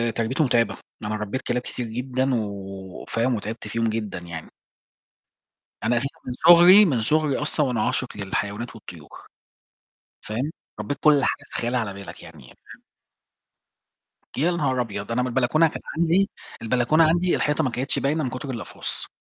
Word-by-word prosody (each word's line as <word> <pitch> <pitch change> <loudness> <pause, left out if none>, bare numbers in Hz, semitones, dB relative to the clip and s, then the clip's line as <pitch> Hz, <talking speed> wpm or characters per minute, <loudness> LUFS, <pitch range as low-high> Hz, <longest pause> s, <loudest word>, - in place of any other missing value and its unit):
تربيتُه 120 +7 0
مُتعبة، 120 -4 +1 0.3
أنا 105 +1 -2
ربيت 105 +5 -3
كلاب 125 0 -1
كتير 125 0 -5
جدًا، 130 +3 -1
و 100 -3 -6
فاهم؟ 120 +2 0
وتعبت 110 +1 -5
فيهم 115 +1 0
جدًا 110 -4 -3
يعني. 85 -2 -8 1.3
أنا 120 +2 +2
أساسًا 135 +3 -3
من 125 - -2
صُغري 175 +4 +9
من 130 - +1
صُغري 150 +3 +2
أصلًا 150 0 +1
وأنا 120 -4 0
عاشق 125 -5 -2
للحيوانات 105 +4 -3
والطيور، 85 -8 -12 1.0
فاهم؟ 120 +8 -2 0.3
ربيت 135 +7 -3
كُلّ 150 -2 +5
حاجة - - -1
تتخيلها 120 +1 -1
على 100 -4 -4
بالك 100 0 -10
يعني، 80 -4 -13
فاهم؟ 60 - -16 1.6
يا 165 +6 +2
نهار 135 -7 0
أبيض! 105 -1 -5
أنا 120 +2 +1
من 125 - 0
البلكونة 130 +6 +3
كان - - -7 0.2
عندي 170 +5 +3 0.3
البلكونة 125 +7 +3
عندي، 175 +3 +3
الحيطة 150 +2 +1
ما 130 - +1
كانتش 130 +3 -1
باينة 150 +2 0
من 130 - -1
كُتر 130 +3 -6
الأقفاص. 120 -4 -4
125 Hz, 155 wpm, -24 LUFS, 110-145 Hz, 1.6 s, صُغري